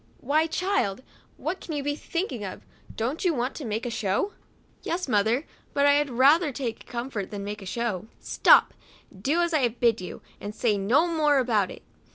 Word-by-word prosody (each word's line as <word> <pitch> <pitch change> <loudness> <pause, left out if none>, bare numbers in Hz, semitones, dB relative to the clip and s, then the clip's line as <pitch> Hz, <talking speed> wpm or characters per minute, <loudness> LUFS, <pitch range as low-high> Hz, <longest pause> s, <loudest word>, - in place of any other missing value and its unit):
" - - -31
Why, 310 +2 +4
child," 320 - 0 0.3
what 355 +4 -3
can 320 - -5
you 285 - -2
be 290 +1 -1
thinking 305 - -3
of? 190 - -7 0.3
don't 255 - -2
you 350 -4 +2
want 250 +1 -1
to 295 - -6
make 220 +1 -2
a 240 - -2
show?" 215 - -1 0.5
"Yes, 355 0 -2
mother, 225 +5 +2 0.3
but 280 - +3
I 285 - +7
had 290 0 +2
ra 265 +6 +6
ther 320 -5 -2
take 245 -4 -5
comfort 235 -5 -4
than 205 -2 -5
make 205 +1 -5
a 195 - -8
show? 220 -2 -2
" - - -32
" - - -34
Stop, - - +5 0.4
do 275 - +1
as 345 -1 0
I 310 - +4
have 240 -3 0
bid 230 -4 +3
you, 180 - -8 0.2
and 205 +1 -6
say 220 -2 +2
no 220 - +3
more 310 -4 +2
about 225 -7 +2
it." - - -10
250 Hz, 215 wpm, -26 LUFS, 215-305 Hz, 0.5 s, I